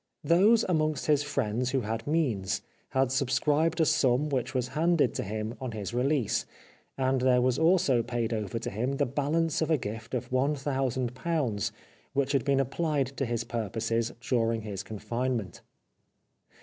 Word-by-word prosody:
Those 200 Hz, +9 st, +5 dB
amongst 155 Hz, -4 st, 0 dB
his 150 Hz, -2 st, +3 dB
friends 125 Hz, -4 st, -1 dB
who 135 Hz, 0 st, 0 dB
had 115 Hz, +2 st, -4 dB
means 130 Hz, -, 0 dB, 0.3 s
had 130 Hz, -1 st, +1 dB
sub 135 Hz, -1 st, 0 dB
scribed 150 Hz, +5 st, +2 dB
a 160 Hz, -, +5 dB
sum 135 Hz, +1 st, +2 dB
which 130 Hz, -2 st, -2 dB
was 125 Hz, 0 st, 0 dB
handed 160 Hz, -4 st, +2 dB
to -, -, -2 dB
him 110 Hz, +2 st, -4 dB
on 130 Hz, -3 st, -4 dB
his 105 Hz, +1 st, -5 dB
release, 130 Hz, -1 st, +1 dB, 0.5 s
and 130 Hz, -1 st, +1 dB
there 125 Hz, -1 st, +4 dB
was 130 Hz, +2 st, +2 dB
also 160 Hz, -7 st, +4 dB
paid 120 Hz, -1 st, -2 dB
over 110 Hz, 0 st, -2 dB
to 115 Hz, -, -4 dB
him 125 Hz, +7 st, -1 dB
the 140 Hz, -, +1 dB
balance 155 Hz, +5 st, 0 dB
of 160 Hz, -, 0 dB
a 160 Hz, -, +4 dB
gift 110 Hz, +1 st, -5 dB
of 125 Hz, -, -4 dB
one 135 Hz, +4 st, +2 dB
thousand 130 Hz, -3 st, -1 dB
pounds 130 Hz, -, -1 dB, 0.4 s
which 140 Hz, -1 st, +1 dB
had 140 Hz, -4 st, +2 dB
been 140 Hz, -1 st, +2 dB
applied 135 Hz, 0 st, -1 dB
to 135 Hz, -, -1 dB
his 115 Hz, -1 st, -1 dB
purposes 115 Hz, 0 st, -2 dB
during 115 Hz, -2 st, +1 dB
his 100 Hz, -3 st, -4 dB
confinement. 115 Hz, -1 st, -3 dB
130 Hz, 170 wpm, -29 LUFS, 115-145 Hz, 0.5 s, Those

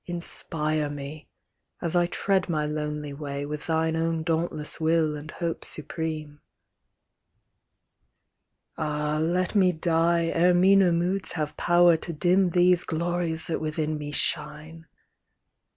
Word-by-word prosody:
Inspire 155 Hz, -3 st, 0 dB
me, 145 Hz, +1 st, -8 dB, 0.5 s
at 170 Hz, 0 st, -1 dB
I 175 Hz, 0 st, +3 dB
tread 190 Hz, +1 st, 0 dB
my 155 Hz, -2 st, 0 dB
lonely 150 Hz, -1 st, -4 dB
way, 140 Hz, -1 st, -5 dB
With 150 Hz, +1 st, -6 dB
thine 160 Hz, 0 st, 0 dB
own 165 Hz, 0 st, -1 dB
dauntless 160 Hz, -2 st, -2 dB
will 160 Hz, -1 st, +1 dB
and 150 Hz, +1 st, -9 dB
hope 165 Hz, +1 st, -4 dB
supreme. 155 Hz, -1 st, -3 dB, 2.4 s
Ah, 150 Hz, 0 st, -1 dB
let 175 Hz, +3 st, 0 dB
me 190 Hz, -3 st, +4 dB
die, 170 Hz, 0 st, +1 dB
ere 175 Hz, +2 st, +3 dB
meaner 190 Hz, 0 st, +5 dB
moods 180 Hz, +3 st, 0 dB
have 150 Hz, -3 st, -3 dB
power 175 Hz, -1 st, +4 dB
To 170 Hz, +1 st, -2 dB
dim 180 Hz, +4 st, +2 dB
these 175 Hz, 0 st, +3 dB
glories 170 Hz, 0 st, -1 dB
that 165 Hz, -, -2 dB
within 155 Hz, 0 st, -2 dB
me 145 Hz, 0 st, -6 dB
shine 155 Hz, +2 st, 0 dB
160 Hz, 125 wpm, -26 LUFS, 150-175 Hz, 2.4 s, meaner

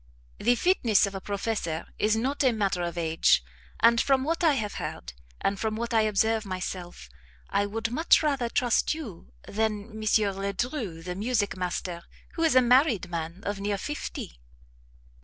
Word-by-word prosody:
The 240 Hz, +3 st, +3 dB
fitness 240 Hz, -, +3 dB
of 200 Hz, -, -5 dB
a 195 Hz, -, -5 dB
professor 200 Hz, -6 st, -3 dB
is 215 Hz, +1 st, +3 dB
not 265 Hz, +6 st, 0 dB
a 260 Hz, -, +5 dB
matter 200 Hz, -5 st, 0 dB
of 175 Hz, 0 st, -3 dB
age; 160 Hz, -, +3 dB, 0.4 s
and, 235 Hz, 0 st, +6 dB
from 270 Hz, -1 st, +2 dB
what 330 Hz, +4 st, -1 dB
I 320 Hz, -3 st, +5 dB
have 215 Hz, -6 st, -2 dB
heard, 60 Hz, +1 st, -6 dB, 0.3 s
and 195 Hz, 0 st, 0 dB
from 220 Hz, -1 st, -1 dB
what 235 Hz, +2 st, -3 dB
I 225 Hz, -, +5 dB
observe 220 Hz, +1 st, +1 dB
myself, 185 Hz, -, -6 dB, 0.4 s
I 205 Hz, -, +1 dB
would 225 Hz, +2 st, -3 dB
much 320 Hz, +5 st, +4 dB
rather 275 Hz, -6 st, 0 dB
trust 245 Hz, +5 st, +1 dB
you 220 Hz, -, -9 dB, 0.2 s
than 215 Hz, 0 st, -2 dB
M. 220 Hz, 0 st, -8 dB
Ledru, 200 Hz, -, -1 dB
the 180 Hz, +1 st, -4 dB
music 210 Hz, +1 st, 0 dB
master, 180 Hz, -1 st, -3 dB, 0.3 s
who 330 Hz, -, -4 dB
is 325 Hz, -4 st, +3 dB
a 255 Hz, -, +7 dB
married 245 Hz, -, +3 dB
man 170 Hz, +2 st, -4 dB
of 205 Hz, -1 st, -3 dB
near 200 Hz, 0 st, -1 dB
fifty." 195 Hz, -, -6 dB
215 Hz, 170 wpm, -27 LUFS, 190-245 Hz, 0.4 s, a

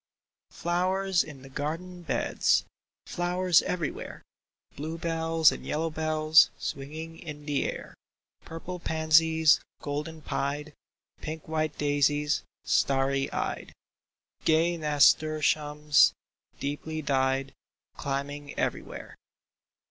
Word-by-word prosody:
Flowers 185 Hz, +2 st, 0 dB
in 140 Hz, -4 st, -11 dB
the 135 Hz, -, -11 dB
garden 165 Hz, +6 st, -5 dB
beds, 170 Hz, -, +1 dB, 0.4 s
Flowers 175 Hz, 0 st, +2 dB
everywhere; 170 Hz, -4 st, -4 dB, 0.5 s
Blue 160 Hz, +3 st, -5 dB
bells 165 Hz, -1 st, +3 dB
and -, -, -7 dB
yellow 160 Hz, +1 st, -2 dB
bells 155 Hz, 0 st, +4 dB
Swinging 160 Hz, +4 st, -6 dB
in 150 Hz, -3 st, -9 dB
the 145 Hz, -2 st, 0 dB
air; -, -, -9 dB, 0.5 s
Purple 175 Hz, +2 st, -7 dB
pansies, 160 Hz, -1 st, +4 dB, 0.2 s
golden 150 Hz, +2 st, -5 dB
pied; 145 Hz, +2 st, -3 dB, 0.5 s
Pink 155 Hz, 0 st, -6 dB
white 155 Hz, -1 st, -1 dB
daisies, 145 Hz, 0 st, +1 dB, 0.2 s
starry 135 Hz, 0 st, +1 dB
eyed; -, -, -3 dB, 0.7 s
Gay 165 Hz, +2 st, +3 dB
nasturtiums, 150 Hz, -1 st, +3 dB, 0.5 s
deeply 155 Hz, +2 st, -4 dB
dyed. 135 Hz, -1 st, 0 dB, 0.4 s
Climbing 140 Hz, +1 st, -4 dB
everywhere -, -, -4 dB
155 Hz, 95 wpm, -28 LUFS, 145-165 Hz, 0.7 s, bells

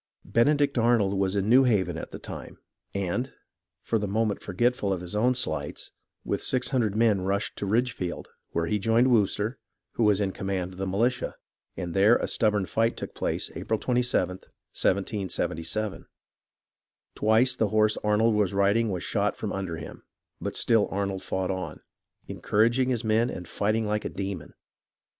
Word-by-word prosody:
Benedict 140 Hz, +2 st, +2 dB
Arnold 115 Hz, -4 st, +3 dB
was 95 Hz, 0 st, 0 dB
in 100 Hz, 0 st, 0 dB
New 125 Hz, +4 st, +6 dB
Haven 95 Hz, -8 st, +2 dB
at 80 Hz, -, -6 dB
the -, -, -7 dB
time, -, -, -9 dB, 0.4 s
and, 100 Hz, +7 st, -1 dB, 0.5 s
for 115 Hz, -, 0 dB
the 105 Hz, -, -2 dB
moment 105 Hz, +1 st, 0 dB
forgetful 105 Hz, +1 st, 0 dB
of 95 Hz, -, 0 dB
his 90 Hz, +3 st, -7 dB
own 125 Hz, +4 st, +3 dB
slights, 75 Hz, -, -2 dB, 0.3 s
with -, -, -1 dB
six 130 Hz, -1 st, 0 dB
hundred 115 Hz, -7 st, +1 dB
men 110 Hz, -4 st, +3 dB
rushed 100 Hz, +2 st, -1 dB
to 100 Hz, -, -3 dB
Ridgefield, 110 Hz, -4 st, -1 dB, 0.2 s
where 85 Hz, -, -1 dB
he 105 Hz, +5 st, 0 dB
joined 115 Hz, +5 st, +3 dB
Wooster, 105 Hz, +2 st, +1 dB, 0.3 s
who 115 Hz, -, -1 dB
was 105 Hz, -2 st, +4 dB
in 100 Hz, -2 st, 0 dB
command 95 Hz, -2 st, -3 dB
of 90 Hz, -, -12 dB
the 95 Hz, -, -2 dB
militia, 115 Hz, +7 st, 0 dB, 0.4 s
and 85 Hz, -2 st, -4 dB
there 100 Hz, +5 st, +5 dB
a -, -, -1 dB
stubborn 105 Hz, -3 st, +1 dB
fight 115 Hz, +4 st, 0 dB
took -, -, -6 dB
place -, -, -2 dB
April 110 Hz, -, -2 dB
27th, 120 Hz, -7 st, 0 dB, 0.3 s
1777. 95 Hz, 0 st, -1 dB, 1.1 s
Twice 110 Hz, +4 st, +3 dB
the 110 Hz, -, +1 dB
horse 110 Hz, +1 st, +3 dB
Arnold 105 Hz, +2 st, +2 dB
was 105 Hz, -2 st, +1 dB
riding 100 Hz, +3 st, +3 dB
was 90 Hz, -3 st, -3 dB
shot -, -, 0 dB
from -, -, -4 dB
under 95 Hz, -4 st, -3 dB
him; 80 Hz, -, -9 dB, 0.4 s
but -, -, -4 dB
still 115 Hz, -3 st, +3 dB
Arnold 100 Hz, -1 st, -2 dB
fought 95 Hz, 0 st, -2 dB
on, 95 Hz, -1 st, -5 dB, 0.5 s
encouraging 120 Hz, +5 st, +1 dB
his 120 Hz, -2 st, 0 dB
men 110 Hz, +2 st, +2 dB
and 90 Hz, -2 st, -6 dB
fighting 110 Hz, +4 st, 0 dB
like 105 Hz, 0 st, -1 dB
a -, -, -3 dB
demon. 95 Hz, -5 st, -5 dB
105 Hz, 165 wpm, -27 LUFS, 95-115 Hz, 1.1 s, New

